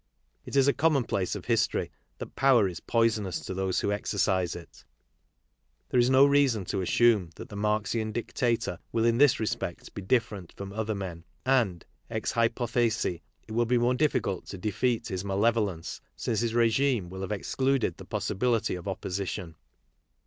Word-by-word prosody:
It - - -7
is 135 0 +5
a 140 - +4
commonplace 135 - +1
of - - -7
history - - +1 0.3
that - - -8
power 130 -7 +4
is 90 -3 -6
poisonous 110 -6 0
to - - -5
those 95 0 -1
'who 100 - 0
exercise 95 -3 0
it; 85 -1 -12 1.1
there 125 - +2
is 120 +1 +4
no 130 +1 +7
reason 140 -8 +3
to 95 - 0
assume 105 -1 +3
that - - -9
the 105 - -9
Marxian 105 +1 0
dictator 115 -4 -1
will 115 0 +1
in 115 +1 +3
this 145 -3 +5
respect 110 - -4
be - - -6
different 100 -4 -1
from 100 0 -8
other 110 0 -2
men. 90 -4 -6 0.2
And, 115 -10 +1 0.2
ex - - -2
hypothesi, 115 -5 0 0.3
it - - -11
will 120 +1 +1
be 125 +1 +3
more 120 +1 +2
difficult 125 -9 0
to 100 - -7
defeat 110 +5 -1
his 95 0 -3
malevolence 100 -3 0
since 110 - -1
his 115 0 -1
regime 115 -4 +2
will 95 0 -6
have 95 - -4
excluded 130 0 0
the - - -10
possibility 115 +2 0
of 90 +1 -6
opposition. 95 -2 -4
110 Hz, 165 wpm, -28 LUFS, 95-120 Hz, 1.1 s, no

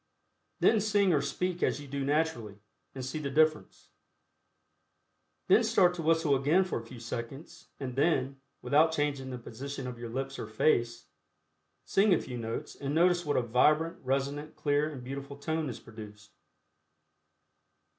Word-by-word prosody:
Then 220 -2 +4
sing 200 -3 +3
or 145 - +3
speak 175 +6 -2
as - - +1
you 145 - -9
do 140 0 -3
naturally, 140 -8 -1 0.4
and 130 -1 -5
see 145 +4 -4
the 140 -2 -3
difference. 150 - +1 1.6
Then 240 - +5
start 195 -5 +4
to 175 - -5
whistle 160 -2 +3
again 150 +8 +3
for 185 - -3
a - - -10
few 120 +1 -11
seconds, 130 +9 -7
and 130 -3 -5
then, 135 -2 +1 0.2
without 150 +6 +4
changing 145 -4 -1
the 125 - -5
position 135 +3 -7
of 125 -2 -6
your 120 -1 -6
lips 135 +3 -4
or - - -5
face, 115 - +1 0.8
sing 195 -1 +4
a - - 0
few 125 -2 -6
notes 115 0 -5
and 140 +1 -4
notice 175 0 +3
what 145 - +1
a 125 - +2
vibrant, 150 +8 +2
resonant, 140 +3 -2
clear 145 +1 +1
and 130 -4 -8
beautiful 140 +2 -7
tone 155 +1 -2
is 120 - -7
produced. 105 -2 -12
140 Hz, 160 wpm, -30 LUFS, 125-160 Hz, 1.6 s, Then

